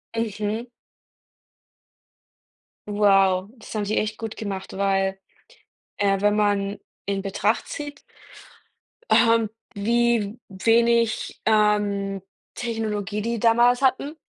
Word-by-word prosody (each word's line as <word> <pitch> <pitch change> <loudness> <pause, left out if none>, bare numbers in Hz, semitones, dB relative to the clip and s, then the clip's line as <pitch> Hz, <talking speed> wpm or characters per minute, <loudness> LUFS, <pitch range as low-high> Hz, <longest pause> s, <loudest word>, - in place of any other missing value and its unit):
Mhm. 220 +1 -2 2.2
Wow, 195 -2 +3
das 220 - -11
haben 215 -2 -1
die 210 +2 -1
echt 215 0 -1
gut 225 -1 -6
gemacht, 195 -3 -5
weil, 195 -1 +1 0.8
äh, 195 -1 +1
wenn 205 0 +3
man 205 -1 +1 0.3
in 195 0 -1
Betracht 205 +3 0
zieht 290 -1 -7 1.1
ähm, 230 -2 +4 0.3
wie 230 0 +1
wenig, 230 +3 +2
ähm, 205 -2 +2 0.3
Technologie, 215 -3 -3
die 230 +1 -2
damals 240 +3 +4
hatten, 275 +3 +1
210 Hz, 95 wpm, -24 LUFS, 200-230 Hz, 2.2 s, ähm